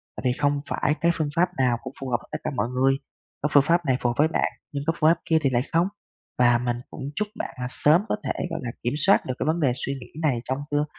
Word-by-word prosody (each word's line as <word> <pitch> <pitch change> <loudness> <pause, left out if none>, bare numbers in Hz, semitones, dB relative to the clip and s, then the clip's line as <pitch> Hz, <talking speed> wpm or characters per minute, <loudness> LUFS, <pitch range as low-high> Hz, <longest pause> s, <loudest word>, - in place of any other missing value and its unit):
Tại - - -6
vì 125 - +3
không 145 +1 +1
phải 145 - +1
cái 170 0 +4
phương 155 -2 -1
pháp 175 +1 +3
nào 125 -2 +2
cũng 130 0 -7
phù 135 - -5
hợp 120 - +2
với - - -19
tất - - -2
cả - - -2
mọi 110 -1 0
người, 135 +2 +2 0.4
có 150 - 0
phương 145 -1 +6
pháp 170 +3 +2
này 130 -2 +2
phù 120 - +2
hợp - - 0
với 150 - +5
bạn, 165 - 0 0.2
nhưng 140 -1 -3
có 165 - +3
phương 155 - +5
pháp 165 0 +3
kia 160 - +3
thì 140 - +2
lại 120 -2 +2
không. 170 +3 +3 0.5
Và 120 -1 +5
mình 120 0 -1
cũng - - -9
chúc 210 +1 -1
bạn - - -5
là - - -1
sớm 150 +6 +5
có - - +2
thể, - - -1 0.2
gọi 165 - -3
là, 120 - -3
kiểm 120 - 0
soát 195 +7 +4
được 130 - -2
cái - - -1
vấn 160 +2 +1
đề 140 -6 +3
suy 135 +1 -2
nghĩ 135 +3 -10
này 140 -7 +1
trong 130 +1 -2
tương 145 0 +2
140 Hz, 295 wpm, -25 LUFS, 125-160 Hz, 0.5 s, phương